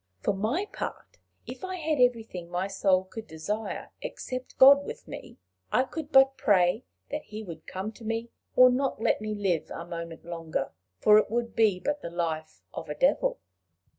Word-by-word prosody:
For - - +2
my 225 - -1
part, 415 - -7 0.3
if - - -9
I 375 0 -3
had 315 -4 -1
everything 225 -8 +1
my 180 +2 -1
soul 190 -1 +2
could 220 +4 -9
desire, 205 +7 -4
except 255 - -6
God 280 +2 +8
with - - -8
me, - - -9 0.3
I 255 - +4
could 295 +3 -6
but 270 -1 +6
pray 180 - +3 0.3
that - - -4
he 215 +1 -7
would 165 -5 -10
come 190 +3 -4
to 225 - -15
me, 225 +1 -3 0.2
or 255 0 +8
not 270 -1 0
let 225 - +1
me 215 0 -3
live 190 -6 0
a 165 - -6
moment 170 -1 -7
longer; 165 -2 -3 0.3
for 210 - +7
it - - -1
would 235 +1 -2
be 210 -5 +3
but 290 +7 -2
the 170 - -5
life 165 -2 -3
of - - -7
a - - -3
devil." - - +2
215 Hz, 185 wpm, -28 LUFS, 180-260 Hz, 0.3 s, God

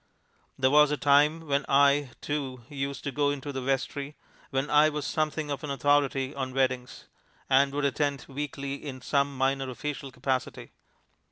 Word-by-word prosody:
There 130 0 +3
was 150 0 +6
a 150 - 0
time 145 +3 +4
when 140 -1 +1
I, 140 0 +4
too, 135 -4 -4
used 140 -1 -4
to 140 - -3
go 145 +1 +1
into 145 0 -4
the 130 - -3
vestry; 135 +2 -2 0.3
when 135 +1 -1
I 150 +1 +5
was 150 -1 -4
something 155 -1 -1
of 140 - -4
an 150 - -4
authority 140 0 +1
on 130 -2 -4
weddings, 130 -2 -1 0.5
and 135 +1 +5
would 145 0 0
attend 140 -1 -1
weekly 140 0 -5
in 130 -3 -7
some 140 +1 0
minor 135 0 0
official 140 +1 -5
capacity. 130 0 -3
140 Hz, 165 wpm, -28 LUFS, 135-145 Hz, 0.5 s, was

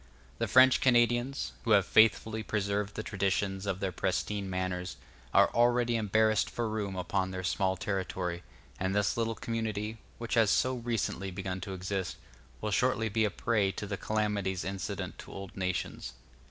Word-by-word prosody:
The - - 0
French 130 0 +6
Canadians, 120 +1 +2
who 115 -2 +3
have 100 -3 +5
faithfully 110 +1 +4
preserved 105 -1 -1
the 110 - -3
traditions 100 -1 -1
of 95 -1 -1
their 95 -1 -1
pristine 95 +2 -2
manners, 90 -1 -3 0.3
are - - +5
already 120 0 +3
embarrassed 110 0 +2
for 120 -1 -2
room 105 -3 -3
upon 95 +1 -1
their 95 0 -5
small 95 0 0
territory; 95 -3 -2 0.4
and 95 +1 -1
this 105 -3 +2
little 115 -1 -1
community, 110 -1 -3 0.2
which 115 -1 -5
has 115 -3 +4
so 130 +5 +3
recently 115 -5 -2
begun 95 0 -4
to 95 +1 -5
exist, 95 0 -3 0.4
will 105 - -2
shortly 115 0 +2
be 110 +1 +2
a - - +1
prey 105 -2 +1
to 105 - -5
the 100 0 -3
calamities 105 -3 -1
incident 95 -1 -4
to - - -10
old 95 -1 -8
nations. 90 -8 -3
100 Hz, 165 wpm, -30 LUFS, 95-110 Hz, 0.4 s, French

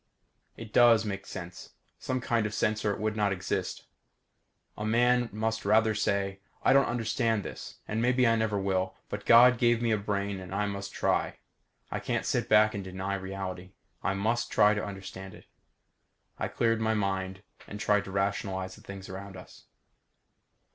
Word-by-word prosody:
_ - - -48 0.5
It 115 -1 -10
does 115 -2 +6
make 100 -2 -5
sense 90 -1 -8 0.3
some 130 -1 -2
kind 115 -3 +1
of 105 - -6
sense 110 0 0
or 105 - +2
it - - -4
would 110 +1 -1
not 105 -2 +1
exist. 95 0 -3 0.9
A 105 - -5
man 120 +2 +3
must 110 +2 -2
say 100 - -4
rather: 110 +1 +4
_I 100 0 -1
don't 140 0 +5
understand 115 -2 0
this - - -8
and 110 +1 -1
maybe 125 +1 +3
I 115 -1 +4
never 110 -2 0
will 95 -1 -1
but - - -6
God 120 +1 +7
gave 120 -1 +3
me 120 -1 0
a 110 - +2
brain 100 -1 -2
and 95 +1 -7
I 105 +1 +1
must 100 -1 -5
try. - - 0 0.5
I - - -2
can't - - -2
sit - - -1
back 110 0 +5
and 100 - -4
deny 95 +1 -4
reality. 95 -1 -5 0.3
I 95 - 0
must 110 +5 0
try 105 0 +5
to 105 - -2
understand 95 -1 -8
it._ - - -16 0.9
I - - -1
cleared 115 -1 0
my 110 0 +1
mind 95 -1 -2 0.2
and 105 - -7
tried 105 -1 +2
to 95 - -8
rationalize 95 -1 -2
the - - -14
things 100 -1 -9
around 95 0 -8
us. - - -14
105 Hz, 180 wpm, -29 LUFS, 95-110 Hz, 0.9 s, God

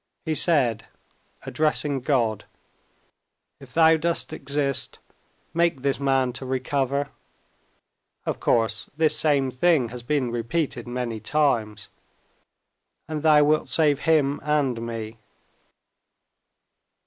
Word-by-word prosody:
He 160 - 0
said, 130 -8 +1 0.6
addressing 150 -2 0
God, 120 -6 0 1.1
"If - - -14
Thou 160 0 +5
dost 170 +2 -1
exist, 140 -1 -2 0.6
make 170 -5 +1
this 140 -1 0
man 135 -2 +1
to 130 - -5
recover" 135 +2 -1 1.2
(of - - -3
course 115 -1 0
this 160 -1 +3
same 140 -4 +2
thing 135 -2 +2
has 125 +1 -8
been 130 -1 -1
repeated 120 +1 -2
many 120 -2 -4
times), 110 -5 0 1.2
"and 155 -1 -4
Thou 150 -1 +5
wilt 155 +1 +1
save 150 -3 +2
him 145 -3 +2
and 140 -5 0
me." 115 -1 -6
140 Hz, 105 wpm, -24 LUFS, 120-150 Hz, 1.2 s, Thou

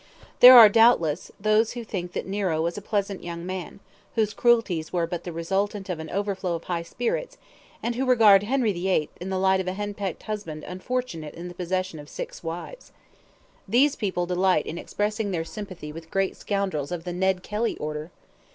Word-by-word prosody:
There 250 0 +11
are, 225 -2 +12
doubtless, 205 -8 +3
those 215 +2 +2
who 240 -1 -6
think 180 -5 -5
that - - -3
Nero 190 -5 -1
was 170 +2 -1
a 205 - -6
pleasant 200 -1 -2
young 170 0 -6
man, 185 0 -6 0.4
whose 215 -2 +1
cruelties 215 -9 +2
were 175 -2 0
but 170 0 -5
the 175 - -4
resultant 195 +4 -2
of 175 -3 -3
an 160 - -7
overflow 195 -3 -2
of 165 - -6
high 175 -2 -2
spirits; 485 - -3 0.5
and 235 - 0
who 260 +2 -2
regard 220 -6 +7
Henry 230 0 +1
VIII. 175 -4 0
in 185 - -4
the 190 - -1
light 190 0 +3
of 185 - -3
a 185 - -1
henpecked 205 -2 -4
husband 205 -8 -5
unfortunate 185 -5 -4
in 175 +1 -7
the - - -9
possession 185 -1 -3
of 145 0 -11
six - - -7
wives. 175 - -7 0.8
These 260 +8 +3
people 185 -4 -1
delight 180 -2 +2
in 170 - -5
expressing 210 0 -2
their 165 -4 -2
sympathy 170 -2 -8
with 165 +1 -10
great 195 +1 0
scoundrels 190 -8 -2
of 175 -2 -4
the 175 0 -5
Ned 190 0 0
Kelly 220 +2 -2
order. 150 +1 -5
190 Hz, 190 wpm, -25 LUFS, 170-210 Hz, 0.8 s, are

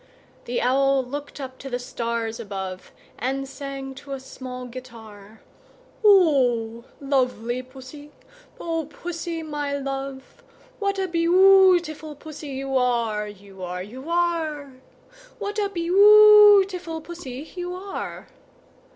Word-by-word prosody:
The 245 - -2
Owl 270 +1 +3
looked 285 +3 -7
up 260 -1 -8
to 270 - -8
the 245 - -2
stars 235 -2 -4
above, 190 -4 -6 0.3
And 270 +2 -2
sang 270 0 -7
to 280 -1 -8
a 270 - -4
small 255 -1 -8
guitar, 225 -4 -12 0.6
"O 255 - +3
lovely 255 -3 -1
Pussy, 265 +3 -12 0.5
O 330 -2 -2
Pussy, 335 0 -6
my 295 -2 -3
love, 270 -1 -6 0.4
What 400 -1 -1
a 380 -1 -1
beautiful 345 -3 +4
Pussy 305 0 -10
you 270 0 -4
are, 230 -4 0
You 200 -2 -13
are, 180 0 -4
You 260 - -10
are! 325 -5 -1 0.6
What 415 +1 -4
a 405 -1 0
beautiful 395 -1 +6
Pussy 310 -4 -9
you 355 0 -4
are!" 390 +2 -6
275 Hz, 115 wpm, -24 LUFS, 250-340 Hz, 0.6 s, beautiful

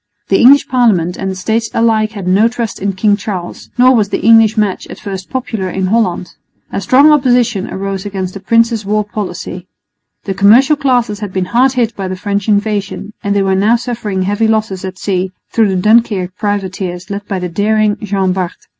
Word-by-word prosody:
The 195 - +3
English 280 +3 +6
Parliament 205 -9 +1
and 195 - -4
the 190 - -4
States 220 +4 -1
alike 220 -1 +1
had 200 -4 -6
no 195 +5 +4
trust 235 -2 -4
in 200 0 -1
King 205 +2 +2
Charles, 200 -4 -6
nor 255 +1 +5
was 210 -3 +1
the - - -2
English 225 -1 +5
match 210 -3 -1
at - - -10
first 190 -2 -7
popular 225 -7 -3
in 190 +1 -2
Holland. 185 -3 0 0.4
A - - -3
strong 270 +9 +5
opposition 245 -7 +2
arose 195 0 -4
against 190 -3 -4
the 200 - -7
prince's 230 +2 +1
war 210 +1 0
policy. 185 -4 -6 0.6
The 195 - -3
commercial 235 +10 +5
classes 245 -7 0
had 205 -3 -5
been 185 -1 -2
hard 255 +2 +3
hit 235 -3 -1
by 195 -1 -4
the 185 - -4
French 200 +1 -3
invasion, 205 0 -1
and 200 0 -1
they 200 - +2
were 190 0 +1
now 205 +5 +3
suffering 230 -5 -3
heavy 205 +4 0
losses 215 -4 -1
at 185 -1 -6
sea 185 -1 -2 0.2
through 225 -2 +2
the 190 - -1
Dunkirk 205 -3 +2
privateers 190 -3 -4
led 200 0 -5
by 195 - -2
the 180 -1 -3
daring 210 +3 +1
Jean 195 -3 -1
Bart. 185 -2 -3
205 Hz, 200 wpm, -14 LUFS, 190-225 Hz, 0.6 s, English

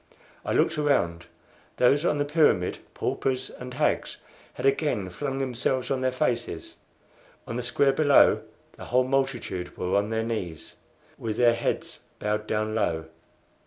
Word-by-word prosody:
I - - -2
looked - - +2
around. 85 - +1 0.5
Those 140 +6 +4
on 150 - +2
the 145 - +1
pyramid 145 - +2 0.2
paupers 130 -1 -1
and 125 0 -9
hags - - 0 0.4
had - - -4
again 135 - +1
flung 135 +8 -3
themselves 130 0 -1
on 130 -1 0
their 130 0 +1
faces. 120 -8 -2 0.7
On 115 - -5
the 125 - -1
square 135 +3 +2
below 145 -1 +5 0.4
the - - -9
whole 125 +1 +3
multitude 130 -9 -2
were 90 +1 -1
on 100 +1 +2
their 110 0 0
knees, 95 -9 -5 0.4
with 110 -1 -3
their 120 -1 +5
heads 115 - -2 0.2
bowed 105 +1 -2
down 110 0 -1
low. 80 -7 -1
125 Hz, 150 wpm, -26 LUFS, 105-135 Hz, 0.7 s, below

